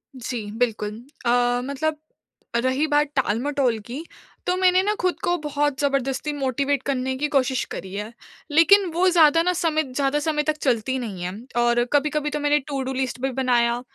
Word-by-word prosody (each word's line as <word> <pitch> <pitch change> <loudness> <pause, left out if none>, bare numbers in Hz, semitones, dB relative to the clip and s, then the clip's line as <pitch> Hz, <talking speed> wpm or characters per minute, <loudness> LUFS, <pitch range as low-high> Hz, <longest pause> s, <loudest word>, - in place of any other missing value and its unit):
जी, 240 -3 -5
बिल्कुल 220 -2 -1 0.4
अ, 245 0 +2
मतलब 300 +3 -2 0.6
रही 260 +5 +1
बात 295 0 +2
टाल-मटोल 260 0 +1
की 270 +7 -6 0.4
तो 360 - +2
मैंने 370 0 +4
ना 420 +1 +1
खुद 365 0 0
को 350 - +2
बहुत 290 -1 -1
ज़बरदस्ती 275 +1 0
मोटिवेट 275 0 -1
करने 260 -1 -1
की 295 - 0
कोशिश 260 -1 +2
करी 190 0 -6
है। 210 +3 -5 0.4
लेकिन 370 +6 +6
वो 360 +2 +3
ज़्यादा 330 -2 +5
ना 360 - +1
समय 320 -2 +1
ज़्यादा 280 +1 +1
समय 300 -1 0
तक 310 0 -1
चलती 260 0 0
नहीं 195 -7 -5
है। 180 - -3 0.3
और 240 0 +3
कभी-कभी 295 +1 +1
तो 300 - -3
मैंने 295 0 +2
टूडू 265 -2 -3
लिस्ट 260 -1 -2
भी 270 0 0
बनाया, 245 -2 +1
275 Hz, 170 wpm, -23 LUFS, 245-300 Hz, 0.6 s, लेकिन